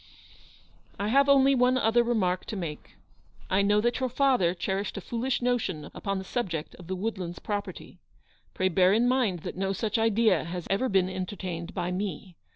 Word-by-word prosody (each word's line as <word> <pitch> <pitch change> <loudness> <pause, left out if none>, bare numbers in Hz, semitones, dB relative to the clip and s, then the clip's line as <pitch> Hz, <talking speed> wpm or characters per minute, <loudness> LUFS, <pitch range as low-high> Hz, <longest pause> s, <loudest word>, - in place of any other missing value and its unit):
" - - -30
I 205 +1 -1
have 275 +4 +4
only 275 0 +6
one 250 0 +3
other 235 0 +3
remark 190 -7 0
to - - -5
make. 165 -6 -6 0.6
I 190 +2 +4
know 205 +1 +3
that 240 +2 0
your 260 -1 0
father 250 -9 +2
cherished 195 +3 -3
a - - -2
foolish 240 +5 -2
notion 200 -12 -1
upon 195 -1 -3
the 190 - -4
subject 180 -8 -3
of 175 - -11
the 190 - -2
Woodlands 185 -3 -4
property. 205 -1 -5 0.6
Pray 185 0 +1
bear 185 +1 +4
in 230 +3 +3
mind 245 -9 +1
that - - -6
no 195 +1 -1
such 220 +2 -1
idea 225 -6 +3
has 175 +1 -5
ever 255 +7 +1
been 190 -2 +3
entertained 185 -2 -5
by 175 +1 -2
me. 190 -1 -4
200 Hz, 185 wpm, -27 LUFS, 185-240 Hz, 0.6 s, only